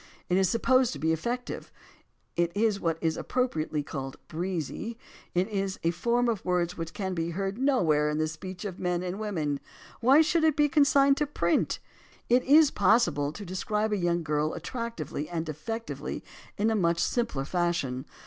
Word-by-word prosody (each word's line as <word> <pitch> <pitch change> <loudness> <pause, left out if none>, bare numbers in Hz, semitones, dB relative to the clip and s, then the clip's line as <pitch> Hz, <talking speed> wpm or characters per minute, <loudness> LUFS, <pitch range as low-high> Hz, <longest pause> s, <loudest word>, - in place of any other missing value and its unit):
It 180 - +3
is 190 -2 +3
supposed 255 +1 +3
to - - -6
be 160 +1 +2
effective, 240 +10 -4 0.6
it 170 0 +1
is 215 -2 +2
what 165 -3 0
is 160 -1 0
appropriately 160 - -1
called 135 -2 -6
"breezy," 180 - -4 0.4
it 180 +2 +2
is 195 -3 -2
a 165 - +3
form 235 +8 +1
of 225 -4 -1
words 180 -1 0
which 165 -1 -6
can 190 -2 -2
be 165 -1 -2
heard 195 +5 -3
nowhere 165 - +3
in 150 - -1
the 155 0 +1
speech 180 +4 -7
of 190 -3 -5
men 180 -1 -1
and 185 +2 -4
women. 160 -10 -2 0.4
AVhy 270 +6 +6
should 320 +1 +2
it 315 -2 +4
be 295 -1 +4
consigned 280 -2 +4
to 295 - 0
print? 170 -12 +1 0.5
It 245 +2 +5
is 295 +1 +6
possible 180 -9 +3
to 205 +6 -8
describe 210 +4 -1
a - - +3
young 175 -3 0
girl 150 0 0
attractively 230 - -5
and 165 -2 -3
effectively 225 +10 -5 0.3
in 215 0 +2
much 170 -1 +2
simpler 230 - 0
fashion. 160 -6 -1
185 Hz, 175 wpm, -28 LUFS, 165-235 Hz, 0.6 s, AVhy